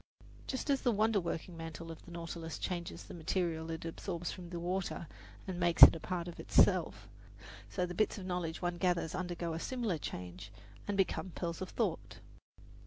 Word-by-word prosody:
Just 270 +2 -1
as 275 - +2
the 245 - +3
wonder 215 0 +3
working 170 0 -4
mantle 165 0 -6
of 165 - -9
the - - -13
Nautilus 165 -1 -5
changes 175 -2 -3
the - - -10
material 165 -1 -1
it 165 0 -4
absorbs 170 +1 -3
from 180 -2 -8
the 175 -1 -4
water 180 0 -2 0.4
and 185 -2 -4
makes 175 -1 +5
it - - +13
a - - -5
part 175 +1 -3
of 175 - -8
itself, - - +3 0.6
so 180 - 0
the 180 - -5
bits 215 +4 +1
of 190 - -6
knowledge 180 -2 -2
one 175 0 0
gathers 175 -3 +1
undergo 175 -2 -2
a 160 - -3
similar 230 -7 -1
change 90 -4 -6 0.4
and 205 -1 -1
become 190 0 +1
pearls 170 +1 -3
of 185 - -3
thought. - - -2
175 Hz, 185 wpm, -34 LUFS, 165-185 Hz, 0.6 s, it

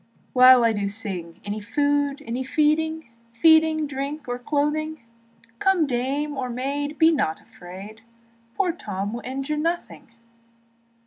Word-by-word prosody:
While 255 -1 +8
I 225 - +3
do 205 -1 -1
sing, 195 -5 -6
Any 205 +1 -3
food, 285 +5 0
any 245 +3 -3
feeding, 310 0 0 0.3
Feeding, 320 -1 +5
drink, 280 +1 -5
or 245 0 -3
clothing; 300 +3 -1 0.6
Come 380 -4 +3
dame 280 +3 -2
or 260 -2 -3
maid, 285 +4 -3
be 320 0 +6
not 270 - 0
afraid, 195 +5 -12 0.5
Poor 370 -3 +1
Tom 205 - -5
will 240 - -5
injure 270 +4 -3
nothing. 335 +3 -3
275 Hz, 130 wpm, -24 LUFS, 235-305 Hz, 0.6 s, While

